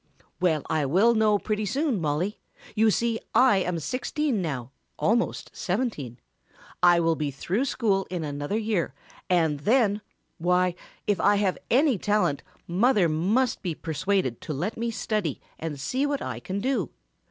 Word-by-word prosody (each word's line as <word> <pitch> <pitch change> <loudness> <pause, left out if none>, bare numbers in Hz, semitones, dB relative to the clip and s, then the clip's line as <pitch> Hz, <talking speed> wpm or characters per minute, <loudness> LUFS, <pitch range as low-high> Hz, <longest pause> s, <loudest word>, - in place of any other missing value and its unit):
"Well, 160 -6 +2
I 155 -2 +1
will 200 - +4
know 215 -2 +3
pretty 215 0 -2
soon, 270 - 0
Mollie. 165 +7 -1 0.3
You 220 0 +4
see 230 +1 +1 0.2
I 250 -6 +6
am 180 -2 0
sixteen 255 - -1
now, 135 -7 -4 0.3
almost 235 +3 0
seventeen. 180 - -2 0.6
I 175 -1 +6
will 165 -1 +2
be 150 -2 -2
through 185 - -1
school 205 -7 0
in 180 -3 -3
another 145 +6 -2
year 205 -11 -1 0.3
and 160 -5 +2
then 215 - +2 0.4
why 180 +1 +2 0.3
if 205 -3 +1
I 205 +1 +4
have 200 -2 0
any 260 -3 +3
talent 210 -9 +1 0.2
mother 200 +1 +3
must 205 +11 +1
be 175 -5 -3
persuaded 165 - -1
to 155 - -4
let 175 +10 -2
me 230 +1 -2
study 215 - -2 0.2
and 155 -3 -4
see 260 - 0
what 285 -1 -2
I 125 -3 -4
can 190 +10 -4
do. 235 - 0
190 Hz, 155 wpm, -26 LUFS, 160-225 Hz, 0.6 s, I